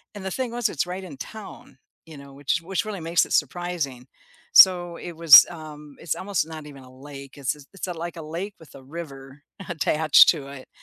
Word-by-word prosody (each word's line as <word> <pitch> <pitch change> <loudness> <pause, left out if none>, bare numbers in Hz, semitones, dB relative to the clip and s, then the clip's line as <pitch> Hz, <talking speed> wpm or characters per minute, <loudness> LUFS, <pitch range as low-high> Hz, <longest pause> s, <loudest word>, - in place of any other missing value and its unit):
and 200 -2 -9
the 190 - -4
thing 255 +1 -3
was 240 -1 -1
it's 145 - -2
right 185 +2 -6
in 160 -6 -10
town, 215 +7 -11 0.3
you 160 -3 -13
know, 140 0 -13
which 140 +2 -2
which 190 +5 -3
really 210 -3 -6
makes 165 0 +1
it - - -15
surprising, 150 -5 -2 0.4
so 175 -2 +6
it 175 - -8
was, 165 -3 +9
um 150 -3 -11
it's 165 -4 -3
almost 190 -4 -2
not 155 -2 -9
even 140 -2 -13
a 130 - -16
lake, 140 +1 -12
it's 135 0 -2 0.2
it's 195 - -6
like 175 0 -6
a - - -7
lake 170 +6 -6
with 160 - -17
a 135 - -13
river 140 -2 -10 0.3
attached 155 -2 +4
to 145 -5 -1
it, 140 -2 -11
160 Hz, 205 wpm, -23 LUFS, 140-175 Hz, 0.4 s, was